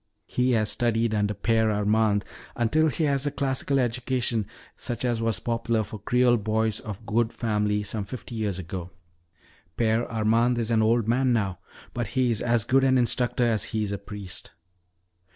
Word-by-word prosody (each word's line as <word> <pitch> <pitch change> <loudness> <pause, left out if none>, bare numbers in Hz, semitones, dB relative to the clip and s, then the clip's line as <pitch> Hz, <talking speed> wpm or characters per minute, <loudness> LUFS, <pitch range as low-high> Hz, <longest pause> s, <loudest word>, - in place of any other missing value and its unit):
He 125 0 +1
has 110 -2 +2
studied 115 -1 +1
under 105 -1 0
Père 110 -1 +2
Armand 105 0 +2 0.3
until 150 +7 +2
he 155 +2 -1
has 140 -1 +1
a - - 0
classical 135 0 0
education 120 -3 0 0.3
such 120 +1 -4
as 120 -2 0
was 115 -5 0
popular 115 0 -1
for 105 +1 -8
Creole 125 +3 +3
boys 110 0 0
of 110 +1 -8
good 115 +1 +1
family 105 -2 0
some 105 0 -3
fifty 120 +3 -8
years 105 -5 -2
ago. 90 0 -6 0.9
Père 115 0 +1
Armand 115 +2 +2
is 115 -1 -1
an 110 -1 +3
old 115 0 +2
man 125 +2 +2
now, 95 -6 -1 0.3
but 120 -3 -2
he 125 -2 +3
is 110 - -1
as 120 -2 +2
good 130 +4 +3
an 130 -1 +4
instructor 125 0 +1
as 115 -3 +1
he 110 -1 -2
is 100 - -3
a 100 - -3
priest. 100 -2 -9
115 Hz, 175 wpm, -26 LUFS, 105-120 Hz, 0.9 s, an